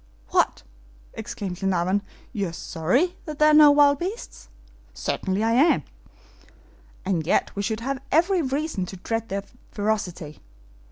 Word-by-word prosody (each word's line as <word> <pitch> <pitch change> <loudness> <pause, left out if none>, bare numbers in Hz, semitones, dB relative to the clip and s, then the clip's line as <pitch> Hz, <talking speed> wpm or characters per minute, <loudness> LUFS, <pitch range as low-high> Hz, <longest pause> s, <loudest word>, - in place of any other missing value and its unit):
"What!" - - +1 0.5
exclaimed 185 -3 -6
Glenarvan, 190 0 +1 0.3
"you 200 -4 -1
are - - -10
sorry 185 - 0
there 305 - -4
are 305 0 +6
no 300 -1 +9
wild 285 -1 +5
beasts?" 390 +7 -6 0.5
"Certainly 190 +2 -2
I 225 - +2
am." 275 +8 +4 1.2
"And 170 -5 -1
yet - - +1
we 200 - -2
should 220 +2 -2
have 270 +2 -3
every 345 +4 +3
reason 275 - -2
to 190 - -8
dread 225 +4 -3
their 195 +1 -3 0.3
ferocity." 190 -8 -3
220 Hz, 135 wpm, -24 LUFS, 190-295 Hz, 1.2 s, no